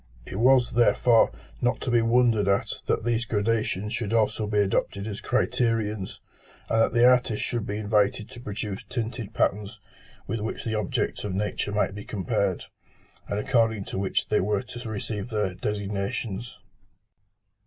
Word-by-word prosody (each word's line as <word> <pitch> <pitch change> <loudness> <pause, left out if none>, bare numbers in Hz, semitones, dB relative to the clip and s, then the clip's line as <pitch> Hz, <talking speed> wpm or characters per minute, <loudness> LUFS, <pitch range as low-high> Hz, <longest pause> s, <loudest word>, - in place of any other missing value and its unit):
It - - -6
was, 125 +1 +4
therefore, 120 -1 +4 0.3
not 120 0 +1
to 125 - -2
be 120 -1 +4
wondered 115 -3 +3
at 100 0 +1
that - - +1
these 120 0 +1
gradations 105 -1 0
should 115 -2 -2
also 110 -1 +1
be 105 0 -1
adopted 100 0 +1
as 105 -2 -5
criterions, 110 -5 0 0.5
and 115 - +3
that - - +2
the 120 0 +5
artist 125 -3 +4
should 120 -3 -2
be 100 - -2
invited 105 0 +1
to 125 - -10
produce 105 -3 -5
tinted 115 -2 -4
patterns 105 +2 0 0.5
with 115 +3 -3
which 110 +2 -4
the 110 - -1
objects 105 -3 -1
of 100 -3 -3
nature 105 0 -2
might 105 -2 +1
be 105 0 -7
compared, 100 -2 -1 0.6
and 100 - -1
according 115 -3 +2
to - - -4
which 95 -1 0
they 105 - +2
were 100 +1 0
to 120 -1 -8
receive 105 +1 -4
their 105 -5 -1
designations. 100 +3 -3
110 Hz, 160 wpm, -26 LUFS, 100-115 Hz, 0.6 s, the